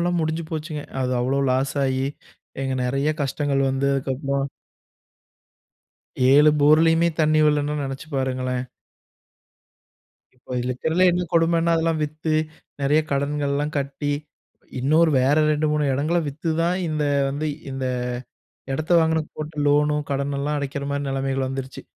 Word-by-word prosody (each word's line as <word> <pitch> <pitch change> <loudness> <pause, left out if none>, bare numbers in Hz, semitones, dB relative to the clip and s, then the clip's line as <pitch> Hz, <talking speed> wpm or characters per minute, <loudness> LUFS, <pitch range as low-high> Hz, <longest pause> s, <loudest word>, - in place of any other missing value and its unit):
எல்லாம் 175 0 +1
முடிஞ்சு 160 +1 -1
போச்சுங்க. 155 -2 -4 0.2
அது 130 0 -1
அவ்வளோ 135 +3 +1
லாஸாயி 130 0 0 0.6
இங்க 135 -1 -1
நெறைய 135 +4 0
கஷ்டங்கள் 140 0 0
வந்து, 135 +1 0
அதுக்கப்புறம் 135 +1 -1 1.8
7 150 +2 +7
போர்லயுமே 165 +3 +5
தண்ணி 155 0 +3
வரலன்னா 150 0 +1
நெனைச்சு 135 +3 -5
பாருங்களேன்! 130 -1 -1 1.7
இப்ப 125 0 -7
இதுல 125 +1 -2
இருக்கிறதுல்லே 160 +8 +1
என்ன 180 +1 0
கொடுமைன்னா, 165 0 +3
அதெல்லாம் 165 -1 0
வித்து, 155 +1 -4 0.5
நெறைய 145 +3 +3
கடன்கள்லாம் 145 +1 -1
கட்டி 140 +1 -2 0.7
இன்னொரு 155 +5 +4
வேற 135 +3 +3
2, 155 +1 +1
3 150 0 +1
இடங்கள 150 +6 0
வித்து 155 +4 -3
தான் 175 +2 +1
இந்த 155 -1 -1 0.2
வந்து 145 +3 -2 0.2
இந்த 135 0 -4 0.9
இடத்தை 155 +5 0
வாங்குனதுக்கு 160 -1 0
போட்ட 155 0 -6
லோனோ, 150 +1 +3
கடனெல்லாம் 140 +1 -1
அடைக்கிற 140 0 -4
மாரி 140 0 -2
நெலைமைகள் 135 0 -1
வந்துடுச்சு. 135 0 -6
145 Hz, 125 wpm, -23 LUFS, 135-155 Hz, 1.8 s, 7